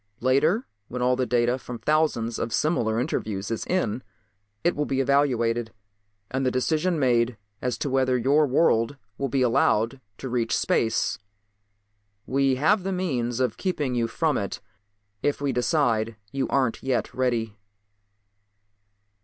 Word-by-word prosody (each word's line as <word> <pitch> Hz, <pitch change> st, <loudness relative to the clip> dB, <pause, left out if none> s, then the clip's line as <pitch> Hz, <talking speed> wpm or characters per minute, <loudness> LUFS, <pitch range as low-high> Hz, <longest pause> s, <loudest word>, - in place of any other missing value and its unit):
Later, 155 Hz, -, +2 dB, 0.2 s
when 125 Hz, 0 st, -3 dB
all 125 Hz, 0 st, +3 dB
the 130 Hz, 0 st, -1 dB
data 120 Hz, +1 st, +2 dB
from 125 Hz, -1 st, -7 dB
thousands 120 Hz, -3 st, 0 dB
of 115 Hz, -, -2 dB
similar 115 Hz, -7 st, +1 dB
interviews 110 Hz, -7 st, -2 dB
is 115 Hz, -, -3 dB
in 130 Hz, -, 0 dB, 0.6 s
it 175 Hz, -, +2 dB
will 150 Hz, 0 st, -1 dB
be 135 Hz, -, -1 dB
evaluated 120 Hz, -5 st, +1 dB, 0.6 s
and 130 Hz, +1 st, -1 dB
the 130 Hz, -, +3 dB
decision 155 Hz, +7 st, 0 dB
made 120 Hz, -4 st, +2 dB, 0.2 s
as 125 Hz, -2 st, -1 dB
to 145 Hz, -, -3 dB
whether 130 Hz, -1 st, +2 dB
your 140 Hz, +5 st, +3 dB
world 130 Hz, -2 st, +2 dB, 0.2 s
will 135 Hz, -, -1 dB
be 130 Hz, +1 st, +1 dB
allowed 120 Hz, +1 st, +2 dB, 0.2 s
to 135 Hz, -, -6 dB
reach 120 Hz, -2 st, 0 dB
space. 110 Hz, -3 st, +1 dB, 1.1 s
We 135 Hz, 0 st, +2 dB
have 185 Hz, +10 st, +3 dB
the 195 Hz, +1 st, -3 dB
means 130 Hz, -10 st, -1 dB
of 125 Hz, -4 st, 0 dB
keeping 150 Hz, -9 st, -1 dB
you 120 Hz, -1 st, +1 dB
from 155 Hz, +4 st, 0 dB
it 100 Hz, -, -4 dB, 0.6 s
if 145 Hz, -, 0 dB
we 140 Hz, -2 st, -1 dB
decide 120 Hz, -5 st, +1 dB, 0.2 s
you 135 Hz, -1 st, -1 dB
aren't 130 Hz, -4 st, 0 dB
yet 130 Hz, -2 st, -1 dB
ready." 120 Hz, -4 st, -1 dB
130 Hz, 145 wpm, -25 LUFS, 115-145 Hz, 1.1 s, all